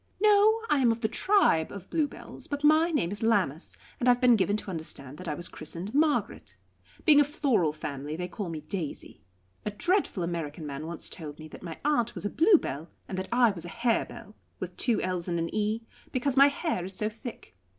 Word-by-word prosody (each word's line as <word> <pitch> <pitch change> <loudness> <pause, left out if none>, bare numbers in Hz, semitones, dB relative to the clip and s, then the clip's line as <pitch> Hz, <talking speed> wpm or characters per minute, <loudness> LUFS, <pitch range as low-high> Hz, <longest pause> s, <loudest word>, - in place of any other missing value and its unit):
"No; 425 +2 +5
I 295 - +3
am 245 -3 +4
of 225 0 -3
the 220 - +2
tribe 235 - +3
of 200 -2 -9
Bluebells, 305 -3 -3
but 285 0 -4
my 310 +3 +5
name 195 - 0
is 205 - -4
Lammas, 195 -9 0 0.2
and 250 - +3
I - - +9
have 245 - -4
been 245 -2 +6
given 205 0 +1
to 205 - -6
understand 150 -4 -5
that 185 - -8
I 150 - -1
was 175 +3 -5
christened 185 +6 -6
Margaret. 300 +1 0 0.5
Being 300 -3 +7
a - - +6
floral 265 - +1
family, 145 -1 -5
they 180 +2 -3
call 195 -1 -5
me 160 -2 -5
Daisy. 170 -5 -5 0.4
A - - -1
dreadful 335 - 0
American 165 -2 -4
man 145 +2 -5
once 170 -1 -6
told 150 -4 -7
me 155 - -9
that - - -11
my 165 -3 -7
aunt 240 -6 +1
was - - -4
a 205 - -1
Bluebell 300 - +3 0.2
and 190 - -5
that 190 0 -4
I 240 -2 +5
was 170 -5 -6
a - - -6
Harebell 230 0 -2 0.3
with 180 -1 -6
two 240 -3 +1
l's 180 -1 -2
and 170 -1 -1
an 165 0 -2
e 215 +2 0 0.3
because 255 0 0
my 275 +1 +8
hair 285 - -1
is 190 +1 -1
so 215 - -1
thick. 225 - -9
210 Hz, 215 wpm, -28 LUFS, 170-275 Hz, 0.5 s, I